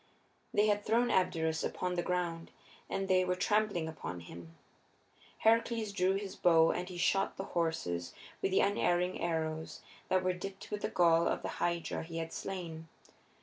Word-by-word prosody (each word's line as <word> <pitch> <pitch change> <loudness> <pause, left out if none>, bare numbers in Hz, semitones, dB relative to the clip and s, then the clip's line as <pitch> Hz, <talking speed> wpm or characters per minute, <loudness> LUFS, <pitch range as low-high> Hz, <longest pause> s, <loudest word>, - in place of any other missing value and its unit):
They 205 +1 +3
had 205 -1 +2
thrown 235 +2 +2
Abderus 160 -3 +1
upon 180 0 -2
the 175 - 0
ground, 175 -2 -2 0.4
and 195 0 -2
they 185 -1 +4
were 180 0 0
trampling 200 -3 +1
upon 90 - -6
him. 85 0 -11 0.8
Heracles 230 -1 +2
drew 190 -1 +2
his 195 0 -4
bow 165 -2 +5
and 180 +1 -3
he 180 - -7
shot 195 +3 +1
the 195 - -3
horses 160 - -1 0.3
with - - +1
the 190 - +3
unerring 180 -3 +1
arrows 160 -1 -2 0.3
that 185 0 +2
were 185 0 +2
dipped 190 +2 -8
with 210 0 -3
the - - -1
gall 170 -1 +4
of - - -1
the - - -2
Hydra 170 -1 -1
he 165 0 -7
had 165 0 -4
slain. 165 -4 -5
180 Hz, 170 wpm, -33 LUFS, 165-195 Hz, 0.8 s, bow